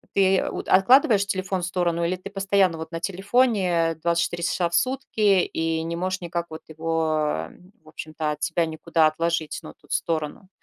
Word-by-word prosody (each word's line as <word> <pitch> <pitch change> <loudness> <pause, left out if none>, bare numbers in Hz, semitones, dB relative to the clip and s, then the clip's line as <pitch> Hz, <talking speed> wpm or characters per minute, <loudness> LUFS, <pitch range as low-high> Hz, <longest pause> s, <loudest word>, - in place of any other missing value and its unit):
Ты 195 -1 +4
от - - -5
откладываешь 200 0 +5
телефон 190 -1 -2
в - - -2
сторону 175 -2 0
или 170 +2 0
ты 185 +2 -10
постоянно 195 -3 +2
вот 160 0 -7
на 165 - -4
телефоне 190 -3 +1
24 170 +1 0
часа 175 0 0
в - - -14
сутки 260 -1 -1 0.3
и 160 0 -2
не 165 +1 -3
можешь 185 +1 -2
никак 170 0 -3
вот 160 - -8
его, 155 - -1 0.3
в - - -26
общем-то, 155 0 -4
от 150 0 -6
себя 170 +2 +1
никуда 160 0 +1
отложить, 165 0 -2
ну, - - -10
тут, - - -18
в - - +2
сторону? 160 +3 -3
170 Hz, 180 wpm, -24 LUFS, 160-190 Hz, 0.3 s, откладываешь